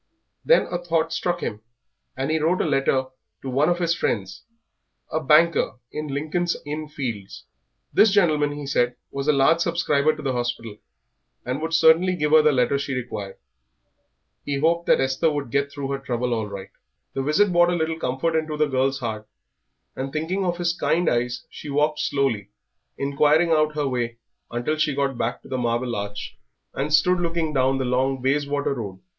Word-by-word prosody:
Then -, -, +5 dB
a 175 Hz, -, -1 dB
thought 165 Hz, -2 st, 0 dB
struck 175 Hz, -1 st, -1 dB
him, 105 Hz, -1 st, -4 dB, 0.6 s
and 135 Hz, +3 st, -1 dB
he 160 Hz, -, +1 dB
wrote 165 Hz, +4 st, +1 dB
a -, -, +1 dB
letter 135 Hz, -3 st, +1 dB, 0.4 s
to 135 Hz, -, -4 dB
one 140 Hz, +6 st, +2 dB
of 175 Hz, -, +1 dB
his 170 Hz, -1 st, +1 dB
friends, 95 Hz, -, -2 dB, 0.7 s
a 160 Hz, -, 0 dB
banker 160 Hz, +2 st, +4 dB, 0.2 s
in 150 Hz, 0 st, -4 dB
Lincoln's 155 Hz, +5 st, -1 dB
Inn 150 Hz, +1 st, -4 dB
Fields. 115 Hz, -10 st, -6 dB, 0.5 s
This 220 Hz, -, +6 dB
gentleman, 155 Hz, -7 st, +2 dB
he 145 Hz, 0 st, -6 dB
said, 125 Hz, -2 st, +1 dB, 0.2 s
was 140 Hz, +1 st, -4 dB
a -, -, +6 dB
large 150 Hz, +4 st, +4 dB
subscriber 155 Hz, -3 st, +1 dB
to 155 Hz, -, -9 dB
the 135 Hz, -2 st, -1 dB
hospital, 120 Hz, -3 st, -3 dB, 0.7 s
and 130 Hz, +4 st, -3 dB
would 165 Hz, +1 st, -1 dB
certainly 165 Hz, +4 st, +5 dB
give 150 Hz, -3 st, -1 dB
her 155 Hz, 0 st, +8 dB
the 150 Hz, 0 st, +4 dB
letter 130 Hz, +1 st, +2 dB
she 140 Hz, -1 st, -3 dB
required. 105 Hz, -6 st, -5 dB, 1.1 s
He 140 Hz, -1 st, -2 dB
hoped 170 Hz, +4 st, +1 dB
that -, -, +5 dB
Esther 135 Hz, +5 st, +1 dB
would 145 Hz, -5 st, -3 dB
get 140 Hz, 0 st, 0 dB
through 140 Hz, -1 st, -5 dB
her 135 Hz, -, -2 dB
trouble 125 Hz, -2 st, -2 dB
all 110 Hz, -2 st, -2 dB
right. 100 Hz, -1 st, -8 dB, 0.4 s
The 135 Hz, -, -2 dB
visit 180 Hz, +9 st, +2 dB
brought 175 Hz, 0 st, +4 dB
a 175 Hz, -, +1 dB
little 160 Hz, -1 st, -1 dB
comfort 135 Hz, +6 st, -1 dB
into 155 Hz, -1 st, -1 dB
the 150 Hz, -, +3 dB
girl's 135 Hz, 0 st, 0 dB
heart; 110 Hz, -3 st, -4 dB, 0.7 s
and 135 Hz, +1 st, -4 dB
thinking 165 Hz, +6 st, -2 dB
of 175 Hz, -2 st, -1 dB
his 175 Hz, -1 st, 0 dB
kind 175 Hz, -1 st, +1 dB
eyes 120 Hz, 0 st, -1 dB
she 150 Hz, -, -10 dB
walked 150 Hz, +2 st, +1 dB
slowly, 120 Hz, -8 st, 0 dB, 0.5 s
inquiring 150 Hz, +4 st, +2 dB
out 155 Hz, -1 st, +2 dB
her 145 Hz, -2 st, 0 dB
way 120 Hz, -3 st, -2 dB, 0.3 s
until 120 Hz, +6 st, -2 dB
she 155 Hz, -2 st, +1 dB
got 135 Hz, -3 st, -1 dB
back 115 Hz, -, -2 dB
to -, -, -13 dB
the 130 Hz, -, -3 dB
Marble 120 Hz, 0 st, -1 dB
Arch, 100 Hz, 0 st, -6 dB, 0.3 s
and 145 Hz, +3 st, -2 dB
stood 175 Hz, +4 st, +4 dB
looking 165 Hz, -2 st, -1 dB
down 135 Hz, 0 st, +2 dB
the 130 Hz, -, -1 dB
long 130 Hz, +2 st, 0 dB
Bayswater 140 Hz, +2 st, 0 dB
Road. 100 Hz, -7 st, -6 dB
145 Hz, 185 wpm, -23 LUFS, 130-160 Hz, 1.1 s, her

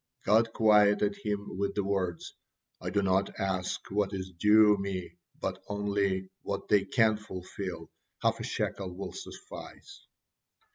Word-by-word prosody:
God 115 Hz, +2 st, +4 dB
quieted 105 Hz, -2 st, +4 dB
him 105 Hz, -2 st, -3 dB
with 100 Hz, 0 st, -1 dB
the 100 Hz, -, +1 dB
words, 95 Hz, -4 st, -2 dB, 0.5 s
"I -, -, -3 dB
do 100 Hz, -1 st, +1 dB
not 95 Hz, +1 st, +1 dB
ask 95 Hz, -1 st, -2 dB
what 100 Hz, 0 st, 0 dB
is 95 Hz, -1 st, -4 dB
due 105 Hz, +3 st, +6 dB
Me, 95 Hz, -3 st, -3 dB, 0.3 s
but 95 Hz, 0 st, -3 dB
only 100 Hz, -2 st, -1 dB
what 100 Hz, -1 st, -4 dB
they 100 Hz, -2 st, +4 dB
can 110 Hz, 0 st, +3 dB
fulfil, 95 Hz, -4 st, -7 dB, 0.3 s
half -, -, +1 dB
a -, -, -4 dB
shekel 95 Hz, -3 st, -3 dB
will 100 Hz, -, -6 dB
suffice." 395 Hz, +1 st, -10 dB
100 Hz, 140 wpm, -30 LUFS, 95-105 Hz, 0.5 s, due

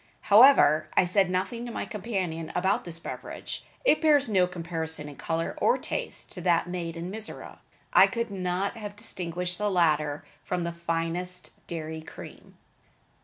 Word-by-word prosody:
However, 155 Hz, -, +7 dB
I -, -, +6 dB
said 190 Hz, +1 st, +2 dB
nothing 190 Hz, +6 st, -2 dB
to -, -, -6 dB
my -, -, -3 dB
companion 185 Hz, -7 st, -3 dB
about 190 Hz, +3 st, +1 dB
this 170 Hz, -2 st, -4 dB
beverage. 165 Hz, -, -7 dB, 0.2 s
It 405 Hz, -, +4 dB
bears 295 Hz, -4 st, +4 dB
no 190 Hz, -4 st, +3 dB
comparison 165 Hz, -3 st, -4 dB
in 145 Hz, -, -9 dB
color 165 Hz, +2 st, -2 dB
or 480 Hz, -, +4 dB
taste -, -, -4 dB
to 180 Hz, -, -6 dB
that 175 Hz, -1 st, +3 dB
made 170 Hz, -2 st, -4 dB
in 175 Hz, +2 st, -5 dB
Mizora. 220 Hz, +1 st, -7 dB, 0.3 s
I -, -, +8 dB
could 230 Hz, -2 st, -3 dB
not 190 Hz, +3 st, -2 dB
have 205 Hz, -2 st, -7 dB
distinguished 180 Hz, -4 st, -2 dB
the 210 Hz, 0 st, +1 dB
latter 155 Hz, -5 st, +1 dB, 0.2 s
from 180 Hz, -1 st, -2 dB
the 170 Hz, -, -2 dB
finest 170 Hz, +2 st, -2 dB, 0.2 s
dairy 160 Hz, -1 st, -5 dB
cream. 155 Hz, -, -12 dB
180 Hz, 160 wpm, -27 LUFS, 165-200 Hz, 0.3 s, I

